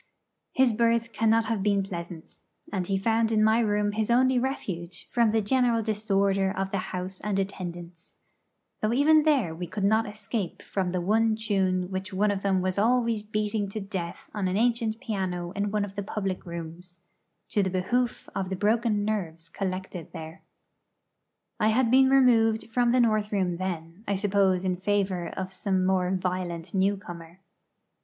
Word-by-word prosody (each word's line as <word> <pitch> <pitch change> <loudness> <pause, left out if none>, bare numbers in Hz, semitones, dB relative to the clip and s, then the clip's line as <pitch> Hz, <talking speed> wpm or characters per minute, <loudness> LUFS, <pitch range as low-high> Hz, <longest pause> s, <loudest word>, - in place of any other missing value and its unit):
His 260 -3 +4
berth 230 +1 +1
cannot 225 0 +3
have 220 -2 -1
been 200 -1 +2
pleasant; 170 -3 -8 0.3
and 185 -3 -1
he 195 - +1
found 225 +3 +1
in 215 -1 +3
my 220 +1 +4
room 210 -2 +1
his 215 +1 -1
only 255 +1 +4
refuge 185 -9 -4
from 235 -2 +3
the 220 0 +1
general 235 0 +2
disorder 200 -2 +1
of 195 0 -2
the 195 - 0
house 185 +1 -5
and 210 -2 -1
attendants, 175 -3 -6 0.6
though 215 +2 0
even 305 +4 +5
there 280 - +2
we 175 +2 -5
could 200 +4 -4
not 220 +2 +2
escape 210 -2 -4
from 190 -2 -2
the 180 0 -1
one 220 +4 +2
tune 190 -4 0
which 190 +1 -4
one 205 +2 +2
of 200 -1 -2
them 195 -2 +1
was 185 +1 -1
always 230 0 +2
beating 210 -1 -2
to 215 - -4
death 190 -4 -6
on 205 -3 -1
an 185 +1 0
ancient 230 -1 +1
piano 180 -5 -3
in 205 +1 -2
one 210 0 0
of 200 - -10
the 205 - -3
public 195 -2 -4
rooms, 170 +1 -8 0.5
to 205 - +2
the 190 - 0
behoof 235 +7 -1
of 190 -1 -2
the 190 - -2
broken 210 +1 +1
nerves 165 -6 -3
collected 185 -2 -5
there. 160 +1 -8 1.2
I 215 - +3
had 230 +2 +2
been 265 +1 +6
removed 230 -4 +4
from 240 0 +2
the 250 0 +4
north 215 -2 +1
room 185 -4 0
then; 175 0 -5
I 200 - +1
suppose 190 -2 +2
in 185 -1 0
favour 190 -3 0
of 190 0 -5
some 190 -2 0
more 185 -1 +2
violent 180 -2 -3
newcomer. 190 -3 -2
200 Hz, 175 wpm, -27 LUFS, 185-220 Hz, 1.2 s, been